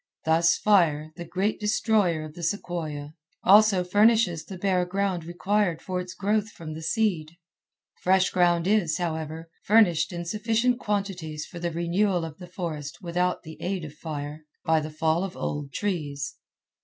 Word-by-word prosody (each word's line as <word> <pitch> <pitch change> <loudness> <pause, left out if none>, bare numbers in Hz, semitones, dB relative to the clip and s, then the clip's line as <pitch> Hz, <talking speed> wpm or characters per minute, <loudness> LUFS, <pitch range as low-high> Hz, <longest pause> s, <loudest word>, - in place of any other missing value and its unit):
Thus 165 +1 +4
fire, 160 -7 +3
the 175 - -7
great 190 +5 -1
destroyer 210 -6 +1
of 155 - -10
the 175 - -9
sequoia, 160 -5 -3 0.3
also 200 -1 +6
furnishes 205 -3 +3
the 190 - -8
bare 185 -1 +1
ground 185 -1 -1
required 175 0 0
for 185 +2 -3
its 180 0 -8
growth 210 +3 0
from 160 -7 -8
the 160 - -7
seed. 170 -5 0 0.7
Fresh 190 +1 +3
ground 175 -2 +3
is, 195 -6 +2
however, 160 -1 -4
furnished 205 -7 +4
in 175 -1 -5
sufficient 225 +5 +1
quantities 185 -8 -3
for 175 - -9
the 170 0 -1
renewal 175 +2 0
of 160 0 -9
the 180 - -9
forests 160 -5 -5
without 180 0 -1
the 160 0 -11
aid 185 -2 -2
of 150 - -9
fire—by 150 +1 -3
the 155 0 -5
fall 160 +3 +1
of 195 -2 -5
old 145 -1 -3
trees. 145 -6 -3
175 Hz, 155 wpm, -26 LUFS, 160-195 Hz, 0.7 s, also